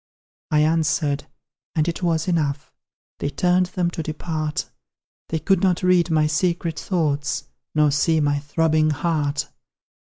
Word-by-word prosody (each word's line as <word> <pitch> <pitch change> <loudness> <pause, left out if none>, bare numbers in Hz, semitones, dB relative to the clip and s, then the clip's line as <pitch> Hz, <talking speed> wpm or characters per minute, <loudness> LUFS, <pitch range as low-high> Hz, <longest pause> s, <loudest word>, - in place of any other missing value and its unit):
I 150 -1 +3
answered 155 -2 +1 0.5
and 155 0 +1
it 170 - -2
was 165 -2 0
enough; 150 -5 -1 0.5
They - - -1
turned 180 +4 +2
them 175 -1 -1
to 165 - -4
depart; 155 0 -3 0.6
They 160 - 0
could 190 +2 +2
not 185 -1 +2
read 180 -1 +4
my 155 -1 +3
secret 165 0 0
thoughts, 145 -5 -1 0.3
Nor 150 -1 +4
see 160 +3 +2
my 145 -1 +1
throbbing 155 +1 +1
heart. 150 -1 -1
155 Hz, 135 wpm, -22 LUFS, 150-170 Hz, 0.6 s, read